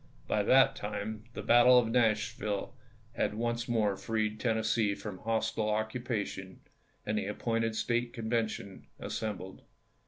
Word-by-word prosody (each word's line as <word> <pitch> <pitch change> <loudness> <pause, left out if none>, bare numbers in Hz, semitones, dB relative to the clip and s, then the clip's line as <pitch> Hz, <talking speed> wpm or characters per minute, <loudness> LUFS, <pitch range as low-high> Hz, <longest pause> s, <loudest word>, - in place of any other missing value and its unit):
By 105 - +1
that 130 +6 +5
time 105 +1 -5
the - - -6
battle 120 +1 +7
of 120 -2 +4
Nashville 110 -2 0 0.4
had 105 - -1
once 120 +1 -1
more 110 -4 +1
freed 110 +1 -2
Tennessee 110 -2 +1
from 100 -2 -7
hostile 110 -1 -1
occupation, 110 -3 -3 0.4
and 105 0 0
the 95 - -3
appointed 115 +1 -1
State 120 +1 0
Convention 110 -3 -3
assembled. 95 -3 -5
110 Hz, 125 wpm, -31 LUFS, 105-115 Hz, 0.4 s, battle